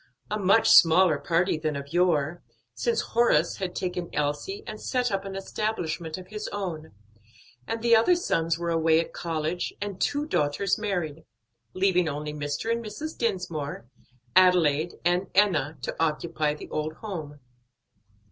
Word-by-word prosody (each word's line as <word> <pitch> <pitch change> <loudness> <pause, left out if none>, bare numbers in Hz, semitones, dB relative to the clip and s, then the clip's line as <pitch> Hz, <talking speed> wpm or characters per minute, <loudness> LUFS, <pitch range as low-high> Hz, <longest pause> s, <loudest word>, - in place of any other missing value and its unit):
A 210 - -1
much 200 +3 +4
smaller 165 -2 +6
party 170 -1 +1
than 155 -2 -2
of 140 +2 -7
yore, 175 -2 +1 0.3
since 470 -1 0
Horace 225 -9 +3
had 185 -2 -4
taken 180 -2 -3
Elsie 150 - -2
and 215 0 -7
set 250 -2 0
up 195 0 -2
an 195 0 -6
establishment 190 -5 -3
of 185 0 -11
his 210 0 -5
own, 170 - -5 0.7
and 225 0 -3
the 235 -1 +6
other 230 +11 +5
sons 165 - 0
were 170 0 -2
away 160 -1 +3
at 165 - -3
college 165 +1 -3
and 200 -2 -5
two 290 +1 0
daughters 195 - 0
married; 175 -7 -3 0.5
leaving 185 -3 +2
only 150 +1 -4
Mr. 145 +8 -3
and 235 0 -1
Mrs. 295 +9 -6
Dinsmore, 175 - -3 0.5
Adelaide 175 -4 +4
and 175 +2 +2
Enna 165 -7 +3
to - - -3
occupy 155 -1 0
the - - -10
old 155 +1 -2
home. 155 -7 -7
175 Hz, 150 wpm, -26 LUFS, 155-205 Hz, 0.7 s, smaller